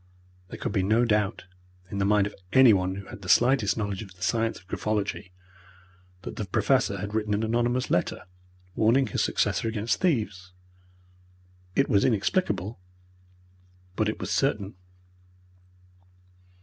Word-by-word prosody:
There - - -9
could - - -3
be 100 - +1
no 110 +6 +3
doubt, 105 -3 0 0.5
in 100 - -3
the 100 - +1
mind 105 -1 +3
of 105 - -5 0.2
anyone 100 -8 +5
who 100 0 -8
had 100 - -11
the 95 - -8
slightest 120 0 +4
knowledge 100 -2 -3
of 95 -4 -11
the 95 - -9
science 115 +1 0
of 90 - -18
graphology, 105 -3 -3 0.9
that - - -7
the 105 - -3
Professor 110 +1 +1
had 100 +2 -5
written 105 -1 0
an 105 - -1
anonymous 120 +3 0
letter, - - 0 0.5
warning 115 +7 +3
his 110 - -1
successor - - 0
against 110 0 -1
thieves. 105 - -1 1.2
It 140 - +3
was 100 -1 +3
inexplicable, 110 - 0 1.2
but 110 +1 +1
it 110 - -3
was 95 +2 -4
certain. 105 -8 0
105 Hz, 145 wpm, -26 LUFS, 100-115 Hz, 1.2 s, anyone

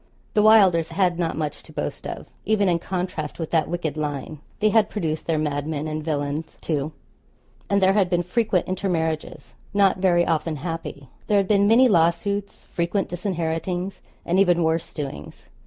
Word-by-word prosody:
The 210 - +4
Wylders 195 -7 +5
had 180 -3 +1
not 165 -3 -1
much 150 -2 -3
to - - -15
boast - - -4
of, - - -6 0.2
even 205 -1 +2
in 170 -2 +2
contrast 175 -4 -4
with 165 -2 -5
that 160 -3 +2
wicked 165 -4 -2
line. 150 0 -4 0.2
They 215 - +3
had 215 -1 +3
produced 160 -7 -3
their 165 -2 +1
madmen 150 0 -2
and 155 0 -3
villains, 150 0 -3
too; 150 -1 -2 0.8
and 200 -1 +2
there 190 +1 +5
had 195 -3 +2
been 175 -1 +1
frequent 190 0 0
intermarriages 165 -4 -2 0.2
not 200 -2 +4
very 175 -2 +3
often 160 -1 0
happy. 150 -2 -6 0.2
There 210 - +3
had 195 -1 +2
been 200 0 +4
many 240 +4 +6
lawsuits, 200 +2 +1
frequent 175 +3 -1
disinheritings, 175 0 -3 0.2
and 180 +3 +2
even 175 -3 +4
worse 160 +1 0
doings. 145 -3 -7
170 Hz, 170 wpm, -23 LUFS, 155-195 Hz, 0.8 s, many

